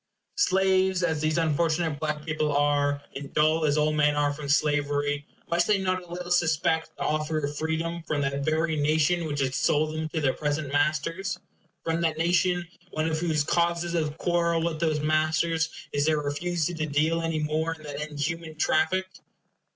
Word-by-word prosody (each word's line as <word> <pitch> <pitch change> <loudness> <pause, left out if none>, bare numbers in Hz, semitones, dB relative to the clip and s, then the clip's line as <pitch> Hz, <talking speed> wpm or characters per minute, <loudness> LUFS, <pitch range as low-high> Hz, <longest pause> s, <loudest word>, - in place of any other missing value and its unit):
Slaves 190 - +3
as 160 -3 0
these 155 +1 +1
unfortunate 160 -1 +1
black 150 -1 -3
people 155 -1 0
are, 145 0 +1
and 140 0 -7
dull 155 +1 +3
as 145 0 +2
all 155 0 +2
men 150 -1 +3
are 145 -1 +1
from 145 -1 -7
slavery, 145 0 +1 0.2
must 170 +1 +1
they 210 - +4
not 185 -1 -1
a 175 -1 -14
little 175 0 -5
suspect 160 -1 +2
the - - -3
offer 155 +1 0
of 145 -1 -2
freedom 165 +2 -2
from 150 -2 0
that 140 0 -1
very 160 +2 +1
nation 155 +3 +2
which 145 -2 -2
has 130 -1 0
sold 155 +1 +1
them 155 0 -3
to 160 - -2
their 135 -4 +2
present 150 -1 -2
masters? 155 +6 0 0.5
from 165 +1 -1
that 160 -2 0
nation, 175 +1 +1 0.2
one 155 -2 -2
of 160 -1 -1
whose 160 -3 +1
causes 170 +2 0
of 155 -2 -1
quarrel 170 -1 +1
with 165 -2 -2
those 155 -2 +1
masters 155 +2 +1 0.2
is 145 +1 +1
their 155 -1 +3
refusal 160 +4 -1
to 155 -1 -1
deal 155 +3 +1
any 165 -1 -1
more 155 +2 -1
in 155 - -16
that 145 -1 -6
inhuman 155 +2 -4
traffic? 160 +4 +1
155 Hz, 180 wpm, -27 LUFS, 150-170 Hz, 0.5 s, they